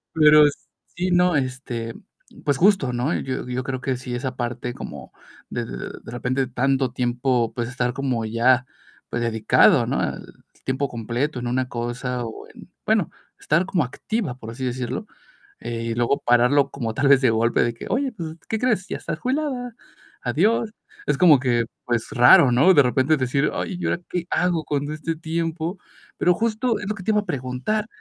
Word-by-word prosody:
Pero, 150 -1 +7
s 145 - -2 0.4
sí, 180 +1 -1
no, 180 -1 +4
este, 125 -4 -3 0.5
pues 145 -2 +1
justo, 180 -9 +3
¿no? 125 +7 0
Yo 130 -1 -4
yo 125 +1 -3
creo 130 -1 -4
que 130 -1 -1
sí, 125 -1 -5
esa 130 +1 -4
parte 120 0 -4
como - - -9 0.4
de - - -3
de - - -8
repente 125 +2 -1
tanto 130 +1 0
tiempo, 125 -1 0
pues, 120 -2 -3
estar 125 0 -1
como 130 -4 -1
ya, 120 +3 +3 0.4
pues 120 - -2
dedicado, 110 -2 +4
¿no?, - - -1
al - - -3 0.4
tiempo 130 +1 -1
completo 120 +5 -2
en 120 - -4
una 125 +1 -1
cosa 120 +1 -3
o 110 - -8
en - - -14 0.2
bueno, - - +2 0.3
estar 165 +5 +1
como 180 -4 +1
activa, 165 - -3
por 115 -3 -8
así 130 +3 -5
decirlo, 125 0 -3 0.5
eh, 115 -1 -4
y 115 0 -2
luego 120 +4 +1
pararlo 125 +4 +4
como 115 -5 -3
tal 140 +5 +1
vez 135 -1 +6
de 130 - +4
golpe 115 +1 +2
de 120 - -1
que: 115 - -9
"Oye, 265 +2 0
pues, 165 -7 -7
¿qué 220 - -1
crees? 220 -6 +1
Ya - - -4
estás - - -5
jubilada. 255 -3 -2 0.5
Adiós". 210 - +1 0.3
Es 150 - +1
como 155 -5 +6
que, 120 -2 +1 0.2
pues 120 -2 -1
raro, 125 +1 +7
¿no? 140 +10 +5
De 145 -5 +6
repente 130 +4 +2
decir: 135 +2 +1
"Ay, 185 - -3
¿y - - -3
ahora - - 0
qué 175 -1 -2
hago 175 -1 +1
con 145 0 -2
este 155 +2 -3
tiempo?". 165 +2 -3 0.4
Pero 180 - +3
justo 230 +2 0
es 200 - -6
lo 210 - -1
que 195 - -9
te 220 - +1
iba 210 -1 +3
a - - -13
preguntar. 140 - -2
130 Hz, 190 wpm, -23 LUFS, 120-165 Hz, 0.5 s, Pero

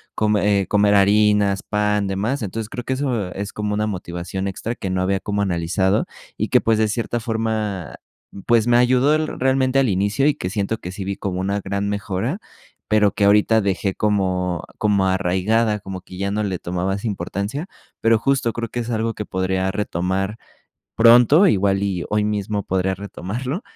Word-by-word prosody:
come 105 -2 +2
eh, 95 - -4
comer 105 +1 +3
harinas, 100 0 +3
pan, 105 -1 0
de 95 - -2
más. 120 +8 -1
Entonces, 110 +1 -4
creo 120 +2 -6
que 130 - -2
eso 125 -9 -2
es 100 +1 -5
como 105 0 -2
una 105 +1 0
motivación 90 0 -4
extra 100 +4 -4
que 95 - -5
no 95 0 -1
había 95 +1 0
cómo 100 0 -2
analizado 95 +2 0 0.3
y - - -2
que, - - +5
pues, 115 -1 +2
de 110 - +3
cierta 120 +2 -2
forma, 110 -5 -2 0.5
pues, 115 -2 +4
me 120 - +4
ayudó 125 +4 +4
el 155 0 0
realmente 130 0 +2
al 135 - +3
inicio, 100 +7 +1
y 150 - +4
que 90 - -5
siento 105 +2 -2
que 90 - -7
sí 95 0 -6
vi 100 +1 -2
como 95 -2 -3
una 100 +2 -1
gran 100 +1 -2
mejora, 100 -2 -2 0.5
pero 105 -1 +4
que 105 - -1
ahorita 105 +2 +4
dejé 95 -1 -1
como 90 -4 0
como 100 -3 +2
arraigada, 95 +4 +1
como 95 -1 -7
que 90 0 -12
ya 100 +1 -1
no 105 +1 -1
le 95 -4 -2
tomaba 90 +2 -2
esa 100 +4 -4
importancia. 100 - -4 0.3
Pero, 115 0 +4
justo 135 -1 +1
creo 115 +1 -4
que 120 - -3
es 115 - -6
algo 115 0 -1
que 105 - -5
podría 95 0 -1
retomar 95 0 -2 0.6
pronto, 120 - +6
igual 100 - +2
y 95 -3 -2
hoy 105 0 +1
mismo 105 -1 -2
podría 95 0 0
retomarlo. 115 - -5
105 Hz, 190 wpm, -21 LUFS, 95-115 Hz, 0.6 s, pronto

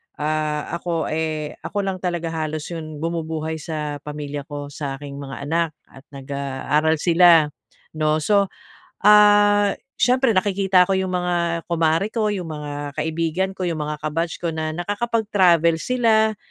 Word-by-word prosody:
ah, 150 0 -2
ako, 165 -3 -2
eh, 155 -1 -3
ako 205 - -6
lang 195 -1 -2
talaga 175 -2 -2
halos 155 -1 -3
'yong 155 -3 -6
bumubuhay 160 -1 -3
sa 150 -2 -4
pamilya 145 -1 -5
ko, 145 -1 -7
sa 140 -2 -4
aking 140 0 -8
mga 135 -1 -7
anak, 165 +1 0 0.2
at 135 - -15
nag-aaral 140 +3 -1
sila, 165 -1 +5 0.4
'no? 155 0 0
So, 200 +2 +3 0.6
ah, 205 -1 +6 0.2
siyempre 255 -4 +3
nakikita 190 -1 +3
ko 195 - -1
'yong 190 0 0
mga 180 -1 0 0.3
kumare 165 +3 +2
ko, 220 -2 0
'yong 190 -3 -3
mga 150 -2 -6 0.3
kaibigan 165 +4 -1
ko, 185 - -3
'yong 165 -3 -2
mga 150 0 -3
ka-batch 165 +2 -2
ko 170 -2 -1
na 155 0 -2
nakakapag-travel 190 -5 +2
sila, 220 -4 +2
165 Hz, 145 wpm, -22 LUFS, 150-190 Hz, 0.6 s, ah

